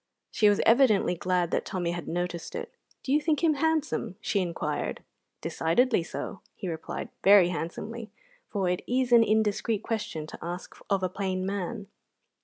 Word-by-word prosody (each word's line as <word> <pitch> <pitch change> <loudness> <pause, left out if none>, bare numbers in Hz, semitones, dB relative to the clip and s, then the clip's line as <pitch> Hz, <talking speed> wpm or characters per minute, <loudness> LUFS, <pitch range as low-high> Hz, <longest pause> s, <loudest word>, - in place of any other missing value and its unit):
She 210 - +4
was 205 - +3
evidently 225 -6 +5
glad 180 0 0
that - - +1
Tommy 175 -2 -2
had 175 0 -5
noticed 175 0 -3
it. - - -5 0.3
"Do 270 - 0
you 300 - +4
think 305 +1 0
him 320 -2 +5
handsome?" 310 - 0
she 205 - 0
inquired. 175 -3 -2 0.4
"Decidedly 225 +7 +2
so," 165 +3 -6
he 195 - -6
replied, 160 -2 -5
very 195 -3 +7
handsomely, 215 +7 -5 0.4
for 195 -3 -1
it 180 0 0
is 250 0 +1
an 235 -1 +8
indiscreet 215 0 +1
question 210 -9 -3
to - - -10
ask 175 +2 -6
of 195 -2 +1
a - - +3
plain 185 -1 -2
man. 200 +2 -3
200 Hz, 165 wpm, -28 LUFS, 180-230 Hz, 0.4 s, an